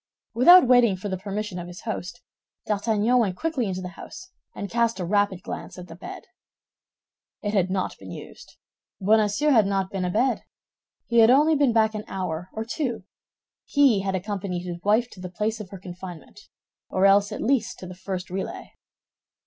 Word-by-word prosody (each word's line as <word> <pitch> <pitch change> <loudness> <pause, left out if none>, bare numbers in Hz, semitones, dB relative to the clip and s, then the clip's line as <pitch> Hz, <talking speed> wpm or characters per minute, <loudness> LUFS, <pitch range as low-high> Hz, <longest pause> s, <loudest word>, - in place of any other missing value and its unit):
Without 345 +9 +8
waiting 240 -6 +5
for 200 +3 -5
the 190 - -2
permission 205 -1 -4
of 175 - -7
his 175 0 -10
host, 225 +1 -5 0.4
D'Artagnan 220 +3 +2
went 200 -6 +1
quickly 315 -8 -1
into 185 -1 -3
the 180 - -5
house, 370 - -11 0.2
and 200 - -4
cast 230 0 0
a 180 - -2
rapid 200 -1 +1
glance - - -7
at 180 0 -9
the 165 - -10
bed. 175 - -9 1.2
It 205 0 -2
had 190 -3 +2
not 185 0 -2
been - - -11
used. - - -11 0.4
Bonacieux 215 +7 +3
had 220 -7 +5
not 195 -1 -1
been 195 -2 -2
abed. 220 +9 +1 0.6
He 235 0 +2
had 225 0 +7
only 295 +5 +5
been 285 -4 +3
back 220 -1 +3
an 215 0 -4
hour 180 -2 -4
or 220 0 -5
two; 235 - -3 0.6
he 275 -8 +4
had 195 0 -2
accompanied 185 -2 -3
his 175 -1 -6
wife 215 +5 +2
to 185 - -13
the 180 0 -6
place 215 +4 -2
of 205 -3 -8
her 195 - -8
confinement, 180 +2 -10 0.4
or 190 +1 +2
else 200 +1 +5
at - - -5
least 245 -2 +1
to - - -9
the 185 - -8
first 185 0 -6
relay. 190 +1 -5
205 Hz, 185 wpm, -25 LUFS, 185-230 Hz, 1.2 s, Without